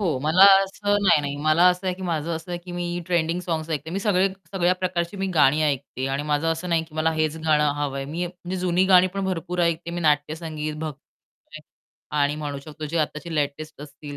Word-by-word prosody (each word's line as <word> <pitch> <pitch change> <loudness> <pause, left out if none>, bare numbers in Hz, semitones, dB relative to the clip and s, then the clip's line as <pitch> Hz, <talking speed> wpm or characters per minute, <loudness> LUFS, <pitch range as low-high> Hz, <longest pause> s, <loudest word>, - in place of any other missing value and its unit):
हो. 170 -9 0
मला 160 +5 +4 0.2
असं 205 +1 -1
नाही, 170 -5 +5
नाही, 145 -1 -4
मला 155 +3 +4
असं 180 +1 -1
आहे 185 - 0
की 190 - -10
माझं 170 -2 -2
असं 160 +2 -8
आहे, 175 - -3
की 180 - -8
मी 175 0 -3 0.2
ट्रेंडिंग 170 0 0
सॉन्ग्स 165 -2 -3
ऐकते. 155 0 -3
मी 190 - -2
सगळे 195 -2 +2 0.2
सगळ्या 180 -1 +2
प्रकारची 180 +1 -2
मी 195 0 -2
गाणी 150 0 +4
ऐकते. 140 -2 -2
आणि 135 +2 -2
माझं 150 +1 0
असं 165 +3 -6
नाही, 165 -1 +2
की 160 - -19
मला 160 +1 +1
हेच 155 0 -1
गाणं 150 -2 +3
हवंय. 135 -1 -2
मी 165 +5 -3
म्हणजे 180 +1 -7
जुनी 180 0 +1
गाणी 180 0 +7
पण 195 -1 -2
भरपूर 180 -1 -3
ऐकते, 170 0 -1
मी 175 +1 -4
नाट्यसंगीत, 155 0 -1
भक्तिगीते 155 0 -10 0.6
आणि 145 +1 +2
म्हणू 145 -2 -4
शकतो 155 +2 -9
जे 165 +3 -2
आत्ताचे 155 +2 -3
लेटेस्ट 150 +1 -3
असतील 145 0 -10
160 Hz, 210 wpm, -24 LUFS, 150-180 Hz, 0.6 s, गाणी